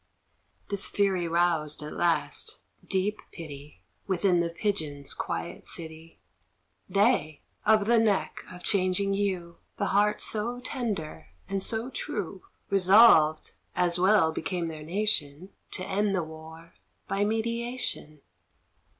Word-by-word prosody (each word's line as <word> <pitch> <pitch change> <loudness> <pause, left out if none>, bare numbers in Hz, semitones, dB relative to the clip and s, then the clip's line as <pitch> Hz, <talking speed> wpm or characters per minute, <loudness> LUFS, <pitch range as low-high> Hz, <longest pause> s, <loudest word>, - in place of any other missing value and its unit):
This 200 0 +3
fury 190 -4 +1
roused, 165 -3 0
at 150 - -6
last, 170 -1 0 0.3
deep 200 +2 -1
pity, 145 - -10 0.2
Within 185 -1 +2
the 170 0 0
pigeons' 160 -7 -2
quiet 85 +1 -5
city; 160 -1 -7 0.7
They 200 -8 +1 0.2
of 215 -1 +5
the 235 +1 +4
neck 215 -3 0
of 180 0 -11
changing 195 0 +1
hue, 185 -4 -2 0.2
The - - -1
heart 210 +1 +3
so 235 +3 +1
tender 225 - -4 0.2
and 195 0 -2
so 225 +5 +1
true 195 -6 -4 0.3
Resolved, 190 -5 +6 0.2
as 175 -1 +2
well 185 -3 +4
became 170 +2 -3
their 155 -1 -8
nation, 170 -2 -1 0.2
To 185 - -3
end 200 0 +1
the 180 - 0
war 160 +1 -12 0.3
by 195 +1 0
mediation. 230 - -2
185 Hz, 120 wpm, -27 LUFS, 160-205 Hz, 0.7 s, Resolved